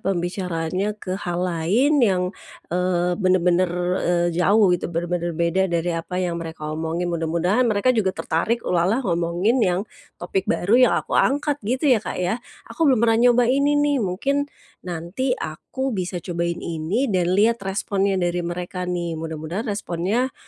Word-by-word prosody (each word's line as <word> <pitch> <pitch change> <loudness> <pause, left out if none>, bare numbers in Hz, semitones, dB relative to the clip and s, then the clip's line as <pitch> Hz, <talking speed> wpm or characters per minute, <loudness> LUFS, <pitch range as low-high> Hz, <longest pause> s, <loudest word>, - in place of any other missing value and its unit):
pembicaraannya 180 +1 -2
ke 185 -3 -6
hal 180 -2 -2
lain 200 - +2
yang, 190 -6 +3 0.5
eee, 180 0 +1
benar-benar, 185 -1 +3 0.3
eee, 175 0 +1
jauh 190 +2 +4
gitu, 175 - -1
benar-benar 170 0 -2
beda 170 +2 +1
dari 170 0 0
apa 165 +2 -4
yang 175 -2 -1
mereka 160 -2 -6
omongin. 165 +2 -2
Mudah-mudahan 170 +9 +1
mereka 220 +4 +2
juga 200 -5 0
tertarik, 225 +9 -1
ulalah 185 +9 +1
ngomongin 175 +7 +1
yang 180 -3 +2 0.4
topik 190 +2 -3
baru 195 +5 0 0.2
yang - - 0
aku - - -9
angkat 290 +2 +1
gitu 250 +7 -2
ya, 225 - +3
Kak, - - -5
ya. 185 +7 -1 0.2
Aku 325 -3 0
belum 260 - +5
pernah 225 0 +3
nyoba 245 0 +4
ini 280 +4 +2
nih, 290 -2 +2
mungkin 275 +9 -1 0.3
nanti 180 +10 -2
aku 260 +12 -4
bisa 185 -1 -3
cobain 170 -1 -3
ini 170 - -1
dan 180 -1 +1
lihat 230 +2 +3
responnya 195 0 -1
dari 175 -1 0
mereka 180 +1 -4
nih, 175 -2 -2
mudah-mudahan 165 +7 -4
responnya, 205 +5 -1
180 Hz, 155 wpm, -22 LUFS, 170-220 Hz, 0.5 s, belum